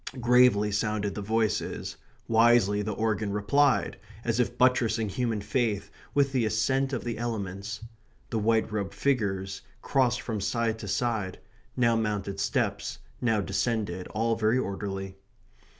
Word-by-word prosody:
Gravely 120 -4 +4
sounded 105 -1 -1
the 105 - -5
voices; 110 0 -1 0.3
wisely 115 -3 +4
the 105 +1 -2
organ 110 -1 -1
replied, 125 +8 +2 0.2
as 115 0 0
if 120 0 0
buttressing 115 -4 +2
human 115 0 -1
faith 110 -3 -1 0.2
with 140 -1 +3
the 130 -3 +1
assent 130 +5 +1
of 130 - -2
the 115 -2 -4
elements. 105 -2 -4 0.5
The 115 - 0
white 110 +1 +2
robed 100 -2 -3
figures 100 -8 -1 0.2
crossed 125 -3 +2
from 110 -4 -3
side 115 +2 0
to 105 - -7
side; 105 -2 -1 0.4
now 120 -2 +3
mounted 105 -3 -2
steps, - - -1 0.2
now 115 -4 +2
descended, 100 -2 -1
all 115 +1 0
very 110 +2 +2
orderly. 95 -3 -4
110 Hz, 135 wpm, -28 LUFS, 100-120 Hz, 0.5 s, Gravely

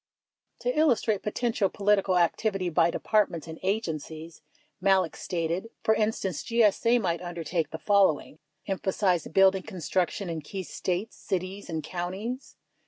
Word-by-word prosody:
To 245 +1 0
illustrate 235 -9 +2
potential 215 -2 0
political 200 -2 +2
activity 185 +2 +1
by 170 0 +3
Departments 195 -3 +1
and 160 0 -8
Agen 190 -4 0
cies, 160 +2 -10 0.4
Malek 190 -3 +3
stated: 175 +4 -2
For 220 - +4
instance, 210 -6 -1
GSA 230 +1 +3
might 170 -5 -1
undertake 170 -1 -2
the 160 - -5
following: 190 -6 +2
— 150 - -49
Emphasize 190 -3 0
building 190 +2 +4
construction 185 0 -2
in 165 -2 -3
key 190 +6 -6
States, 185 +4 -3
cities, 190 +2 -4
and 160 -2 -3
counties. 190 +9 -5
190 Hz, 135 wpm, -28 LUFS, 170-210 Hz, 0.4 s, For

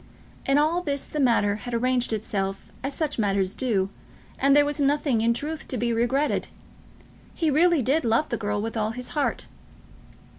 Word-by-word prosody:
In 275 +1 +4
all 315 +4 +2
this 280 -5 -1
the 300 - -5
matter 225 -6 +3
had 245 +2 -5
arranged 250 +1 +1
itself 195 -3 -3
as 275 +1 -3
such 300 -5 -2
matters 195 -2 +1
do, 200 -7 0 0.5
and 275 +1 +4
there 290 0 +6
was 290 0 -2
nothing, 280 -4 +2
in 230 +1 +3
truth, 300 +6 -4
to 255 - -2
be 235 +1 0
regretted. 255 +6 0 0.9
He 320 -3 +1
really 330 -1 +4
did 285 +7 +2
love 230 +6 +1
the - - -1
girl 205 -1 -2
with 225 +1 -4
all 220 0 -1
his 250 +1 -6
heart. 295 -2 -1
250 Hz, 180 wpm, -25 LUFS, 220-290 Hz, 0.9 s, there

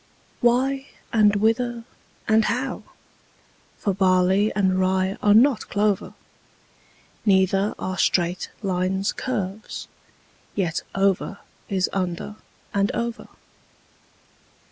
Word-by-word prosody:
Why, 265 +3 +2 0.3
and 210 -2 +5
whither, 230 +3 +1 0.4
and 220 0 +4
how? 255 +2 -2 1.0
for 200 - -1
barley 190 +2 +3
and 190 -2 +2
rye 190 +1 +1
are 205 0 +5
not 255 +1 +4
clover: 205 -1 0 1.1
Neither 195 0 +2
are 185 0 -4
straight 175 0 +1
lines 190 +1 0
curves: 215 -4 -4 0.7
yet 175 -5 -1
over 195 0 +1 0.3
is 190 -2 +1
under 185 +2 -3 0.4
and 200 0 +1
over. 235 0 -3
200 Hz, 95 wpm, -23 LUFS, 190-225 Hz, 1.1 s, and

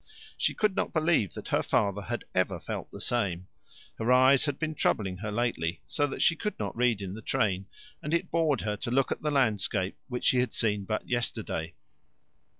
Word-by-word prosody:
She - - +1
could 210 -3 +1
not - - -1
believe 155 - +2
that - - -7
her - - +2
father 100 -1 +1
had 120 +4 -4
ever 95 -1 +1
felt - - -5
the - - -10
same. 95 -7 -1 0.5
Her 115 +3 +1
eyes 130 +2 +6
had 145 -2 -1
been 155 -1 -2
troubling 95 -10 0
her 105 +2 -4
lately, 105 -7 -1
so 145 +4 0
that 135 - -2
she 170 - +5
could 210 +4 -3
not 100 -2 -4
read 115 -4 +1
in 95 -1 -5
the 110 - -8
train, 100 -6 0 0.3
and 150 - -4
it 170 - 0
bored 160 -4 +2
her 105 -1 -1
to 120 - -4
look 135 +2 +2
at - - -2
the 150 - 0
landscape, 105 -8 +1
which 125 -3 -4
she 125 - +4
had 125 -2 0
seen 105 -3 0
but 110 +2 -3
yesterday. 110 -9 -2
120 Hz, 205 wpm, -29 LUFS, 100-135 Hz, 0.5 s, eyes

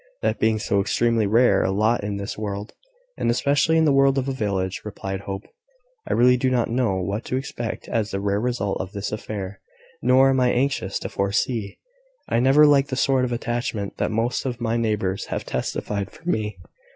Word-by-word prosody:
"That - - 0
being 110 0 +2
so 100 -1 +1
extremely 115 +1 +1
rare 110 -2 +4
a - - +1
lot 110 +4 +1
in 100 0 -3
this 100 0 -5
world, 105 0 -5 0.5
and - - +1
especially 140 +6 +2
in 160 - +4
the 150 - +4
world 135 0 +4
of 135 0 0
a - - 0
village," 100 -6 -2
replied 95 -2 -5
Hope, 95 0 -6 0.7
"I - - +1
really 125 +1 +5
do 130 +1 +1
not 120 -3 +1
know 120 -5 +1
what 100 +4 -2
to 130 - -1
expect 120 -3 -5
as 110 -2 -1
the 95 - -3
last 100 +1 0
result 120 -5 -1
of 95 +2 -7
this 100 -1 -4
affair, 100 -2 -5 0.4
nor 130 +2 +5
am 130 - +2
I 125 -1 +3
anxious 125 -7 0
to - - -4
foresee. 100 +2 -1 0.5
I - - +1
never 135 +5 +6
liked 140 -2 +4
the 130 - -2
sort 130 -1 +2
of 125 - -4
attachment 120 -4 -3
that - - 0
most 115 +3 -1
of 125 -2 -3
my 115 -1 -1
neighbours 105 -5 -1
have - - -4
testified 100 -2 -3
for 165 - -16
me. 105 - -1
115 Hz, 200 wpm, -23 LUFS, 100-125 Hz, 0.7 s, never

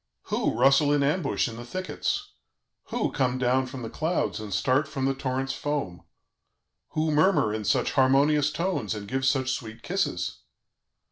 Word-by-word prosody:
"Who - - 0
rustle 140 +3 +5
in 145 -1 +3
ambush 145 0 +1
in 115 -1 -7
the 120 - -7
thickets? 185 - -3 0.5
Who - - -1
come 130 -2 0
down 130 +1 +1
from 130 -1 -7
the 115 - -4
clouds 160 -5 -1
and 105 -2 -7
start 130 +9 +2
from 135 -3 -3
the 135 - +2
torrent's 135 0 -2
foam? 135 -13 -3 0.9
Who 155 0 +1
murmur 150 - +3
in 110 -1 -3
such 100 - +2
harmonious 140 +2 +3
tones 150 - -1
and 105 -1 -7
give 135 +3 -1
such 130 -1 +2
sweet 110 -2 -7
kisses? 90 - -1
135 Hz, 160 wpm, -26 LUFS, 120-150 Hz, 0.9 s, rustle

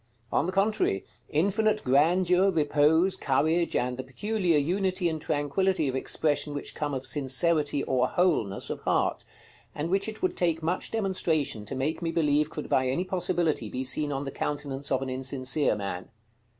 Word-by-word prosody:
On - - +2
the 185 - -1
contrary, 195 - +1 0.2
infinite 210 +7 +1
grandeur, 175 +7 +3
repose, 160 +2 +3
courage, 160 +5 +1
and 125 0 0
the 130 - -4
peculiar 180 +5 0
unity 185 +4 0
and 160 -2 -3
tranquillity 155 +3 0
of 130 - -1
expression 145 +2 -1
which 145 - -5
come 145 -2 -3
of 130 0 -5
sincerity 145 +1 +1
or 125 -1 +1
wholeness 155 - 0
of - - -4
heart, - - 0 0.5
and 160 +4 -3
which 195 +3 +1
it 220 - -10
would 370 - +1
take 165 -2 0
much 175 +3 -1
demonstration 165 - -1
to - - -5
make 140 +6 -2
me 170 - -1
believe 150 -2 +2
could 150 - -6
by 130 0 +2
any 135 +8 0
possibility 175 - -1
be 130 +4 -3
seen 145 +3 0
on 140 0 -3
the 135 - -4
countenance 145 -1 -4
of 135 0 +1
an 135 - -4
insincere 130 +1 0
man. 100 -3 -5
150 Hz, 170 wpm, -27 LUFS, 135-180 Hz, 0.5 s, grandeur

